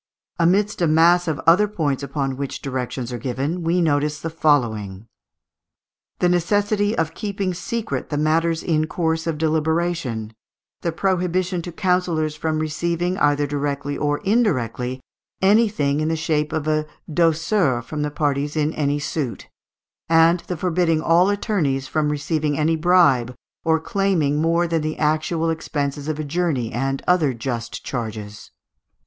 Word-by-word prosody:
Amidst 195 +4 +2
a 170 - +3
mass 170 +3 +4
of 155 -4 -1
other 180 +6 +5
points 150 -10 -1
upon 140 -1 -2
which 140 0 -4
directions 130 -2 -4
are 120 - -4
given, 140 +7 -2
we 170 +2 +1
notice 150 -1 +1
the 165 - -5
following: 115 -11 0 1.1
the 180 - +2
necessity 205 +4 +1
of 160 0 0
keeping 200 -2 -3
secret 220 +5 -4
the 145 - -2
matters 160 +2 +1
in 155 -2 +1
course 160 -1 -1
of 160 -2 -1
deliberation; 160 -7 -1 0.5
the 170 - -1
prohibition 180 0 0
to 175 - -7
councillors 180 -4 0
from 155 0 -1
receiving, 170 +3 -1
either 145 0 +3
directly 145 0 -2
or 145 0 0
indirectly, 130 - 0 0.4
anything 195 -8 +3
in 155 - 0
the 160 - +1
shape 155 -1 -1
of 160 -1 -2
a 155 0 +1 0.2
douceur 165 - +1
from 150 +4 -5
the 150 - 0
parties 145 0 -1
in 155 0 0
any 145 -1 0
suit; 145 -3 -4 0.6
and 165 +2 +5
the 180 - -3
forbidding 170 -1 +1
all 170 +4 +4
attorneys 165 - 0
from 155 0 0
receiving 150 0 -1
any 160 +2 +2
bribe 155 -8 +3 0.3
or 160 0 +2
claiming 160 -5 0
more 165 +2 +2
than 165 -1 0
the 155 +1 -3
actual 160 +2 0
expenses 145 -2 -3
of 155 -1 -2
a 155 - -3
journey 145 -6 -1
and 135 +2 -2
other 160 -8 +3
just 115 -1 -5
charges. 110 -4 -5
155 Hz, 150 wpm, -22 LUFS, 145-175 Hz, 1.1 s, other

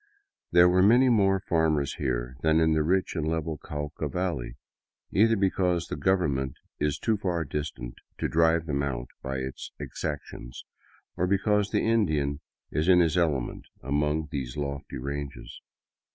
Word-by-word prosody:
There 85 0 +7
were 90 +1 +4
many 120 +6 +6
more 100 -4 +3
farmers 80 -5 +1
here 60 -2 -2
than 80 0 +3
in 80 -1 +3
the 80 - +2
rich 90 +5 +1
and 80 -2 -1
level 80 -1 -2
Cauca 75 0 -5
valley, 85 -10 -3 0.5
either 115 +3 +4
because 90 -3 +1
the - - -2
government 70 -5 0 0.2
is 75 0 0
too 110 +3 0
far 90 -5 -1
distant 70 -4 -5 0.2
to - - -1
drive 80 0 +3
them 70 -3 -1
out 65 -3 -3
by 65 +1 -3
its 65 0 -6
exactions, 70 -5 -6 0.5
or 90 - 0
because 100 +1 +2
the - - 0
In 115 -3 +3
dian 70 -2 -1 0.3
is 75 +3 0
in 90 -1 +7
his 80 -3 +3
element 80 -8 0 0.2
among 75 +2 0
these 65 -1 -4
lofty 70 -1 -4
ranges. 70 +2 -6
80 Hz, 155 wpm, -27 LUFS, 70-90 Hz, 0.5 s, There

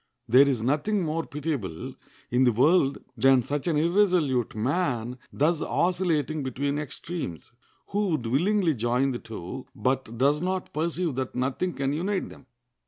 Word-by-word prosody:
There 130 +5 +6
is 125 -5 0
nothing 155 - +1
more 160 +1 -2
pitiable 140 - -4 0.4
in 125 +2 +3
the 125 - +5
world 140 +4 +3 0.2
than 130 +1 +4
such 145 +6 -3
an 160 -3 +2
irresolute 165 - +2
man 125 -1 -1
thus 155 +3 +1
oscillating 165 -4 0
between 140 +2 -2
extremes, 150 - -6 0.4
who 205 +1 0
would 155 -9 -1
willingly 170 - +2
join 125 +3 +1
the 120 - -4
two, 110 +4 -8
but 130 -3 -1
does 140 +4 +3
not 185 +1 -2
perceive 165 +1 -1
that 130 -1 -3
nothing 135 +8 -1
can 135 0 -1
unite 190 +6 -1
them. 130 - -15
145 Hz, 150 wpm, -26 LUFS, 125-170 Hz, 0.4 s, There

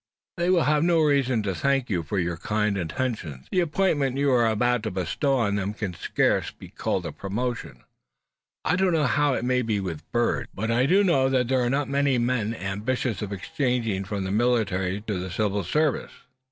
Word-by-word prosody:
"They 175 +1 +1
will 180 -3 +4
have 150 0 +2
no 170 -1 +3
reason 135 -6 +2
to 100 -2 -1
thank 135 +4 +1
you 90 -5 0
for 80 +5 -4
your 85 -2 0
kind 105 +3 0
intentions. 85 - -3
The 185 - +2
appointment 155 -6 +1
you 140 0 +2
are 120 -2 +4
about 120 +2 +1
to 110 - -3
bestow 95 - 0
on 100 -4 +1
them 100 +1 -2
can 105 -5 -4
scarce 85 - 0
be - - -13
called 90 - -2
a 85 - -3
promotion. 100 - -4 0.8
I 180 - +2
don't 190 -2 +2
know 155 -3 +2
how 145 +2 +2
it - - -2
may 125 0 +2
be 110 -4 -1
with 85 -5 -6
birds, 120 0 0
but 110 +3 -2
I 125 +3 +3
do 195 +6 +4
know 135 -8 +3
that 125 -2 +1
there 130 -1 +2
are 120 - +1
not 140 +2 0
many 140 -1 +2
men 120 -2 0
ambitious 110 +2 -2
of 105 -1 -4
exchanging 115 -1 -1
from 100 0 -3
the 95 - -3
military 100 -4 +1
to 105 -3 -3
the 95 +1 -5
civil 100 +1 -1
service." 150 - 0
120 Hz, 205 wpm, -25 LUFS, 100-135 Hz, 0.8 s, will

